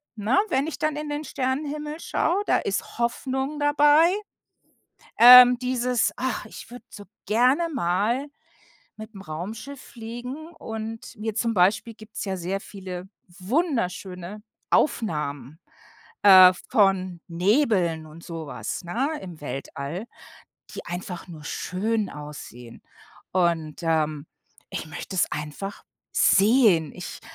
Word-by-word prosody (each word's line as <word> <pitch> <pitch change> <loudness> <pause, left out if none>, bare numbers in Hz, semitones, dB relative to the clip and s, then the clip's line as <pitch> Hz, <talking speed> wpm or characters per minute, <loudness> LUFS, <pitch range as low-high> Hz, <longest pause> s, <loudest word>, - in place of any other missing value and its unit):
ne, 220 +5 +2
wenn 265 +2 +1
ich 320 - -6
dann 310 -1 0
in 300 0 -5
den 295 +1 -3
Sternenhimmel 295 +4 -3
schaue, 370 +3 0
da - - +3
ist 200 +1 -3
Hoffnung 265 +4 -2
dabei, 295 +2 +5 1.1
ähm, 250 +1 +10
dieses: 250 -3 0
„Ach, 255 -4 -2
ich 220 - -11
würde 245 - -11
so 205 - -10 0.2
gerne 250 - +3
mal 230 +5 0 0.7
mit'm 215 -2 -10
Raumschiff 215 - -7
fliegen, 240 +6 -8
und 225 +1 -7
mir 215 0 -4
zum 230 0 0
Beispiel 200 +5 +2
"gibt's 215 0 -8
ja 190 -1 -2
sehr 185 +3 -3
viele 185 -3 -8 0.3
wunderschöne 195 - -2 0.3
Aufnahmen, 150 - 0 0.6
äh, 185 -2 +9 0.2
von 185 -4 +2
Nebeln 180 - +1
und 160 +2 -13
so 165 -2 -7
was, 125 - -5
ne, 270 - -2
im 175 -5 -10
Weltall, 145 +6 -5 0.7
die - - -7
einfach 175 +1 -6
nur 160 -4 -10
schön 210 +6 -2
aussehen. 145 -5 -10 0.5
Und, 170 -4 0
ähm, 155 -2 0 0.4
ich - - -5
möchte 160 +5 -7
es 175 - +3
einfach 150 +7 -6 0.3
sehen. 200 - +4
Ich - - -8
210 Hz, 120 wpm, -25 LUFS, 175-250 Hz, 1.1 s, ähm